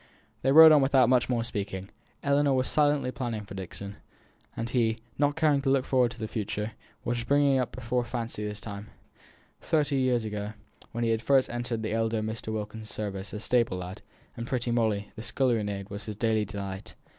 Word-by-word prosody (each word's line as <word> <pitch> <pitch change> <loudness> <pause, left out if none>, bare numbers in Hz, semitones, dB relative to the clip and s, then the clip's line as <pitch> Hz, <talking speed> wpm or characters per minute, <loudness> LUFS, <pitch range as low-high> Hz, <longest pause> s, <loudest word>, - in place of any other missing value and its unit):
They 135 - +2
rode 160 +2 +10
on 150 -2 +7
without 135 -3 +4
much 125 -1 +3
more 120 -2 +1
speaking. 100 -3 -4 0.3
Ellinor 140 0 +3
was 130 0 +1
silently 145 -3 +2
planning 120 -5 -3
for 100 - -10
Dixon, 100 +1 -7 0.6
and 115 - -2
he, 115 -2 +1 0.2
not 145 0 +2
caring 150 -3 +3
to 135 - 0
look 135 -1 +3
forward 125 -2 +3
to 120 - -10
the 110 - -3
future, 105 -1 -3 0.3
was 120 0 -1
bringing 140 +1 +3
up 125 - -1
before 125 0 -1
his 120 - -8
fancy 115 -2 -3
the 105 - -4
time, 105 -1 -7 0.7
thirty 145 -3 +1
years 125 -3 +2
ago, 105 0 -4 0.4
when 120 0 -2
he 115 - +2
had 110 -1 0
first 135 +2 +3
entered 120 -1 -3
the 110 - -2
elder 115 -1 0
Mr. 110 0 -4
Wilkins's 110 0 -5
service 100 -2 -4
as 105 0 -5
stable 115 -7 +2
lad, 90 +1 -7 0.3
and 115 +1 -5
pretty 125 -2 -1
Molly, 110 -4 0
the - - -7
scullery 120 0 +1
maid, 100 -1 -5
was 100 +1 -5
his 105 - -5
daily 110 0 +1
delight. 100 +1 -6
115 Hz, 200 wpm, -28 LUFS, 105-130 Hz, 0.7 s, rode